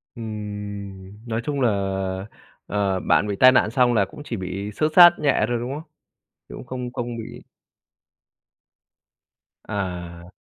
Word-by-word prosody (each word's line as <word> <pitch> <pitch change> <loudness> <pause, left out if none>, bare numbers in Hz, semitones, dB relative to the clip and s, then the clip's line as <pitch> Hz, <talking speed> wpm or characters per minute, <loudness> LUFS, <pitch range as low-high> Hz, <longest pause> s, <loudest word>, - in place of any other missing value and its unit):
Ừm, 105 -2 -7
nói 115 0 -2
chung 140 +1 -2
là, 125 - +4 1.0
ờ, 100 -2 0
bạn 105 - +2
bị 100 - -2
tai 130 0 +9
nạn 130 - +3
xong 125 -1 +3
là 105 -4 +3
cũng 145 - -12
chỉ 115 - -4
bị 95 +2 -5
xước 155 +8 0
xát 175 -1 +10
nhẹ 140 -7 +2
thôi, 120 0 0
đúng 120 +3 -4
không? 155 +2 -8 0.6
Cũng - - -9
không 125 0 -6
không 120 -1 -4
bị 115 - -8 2.2
À. 90 -4 -5
110 Hz, 145 wpm, -23 LUFS, 100-125 Hz, 2.2 s, xát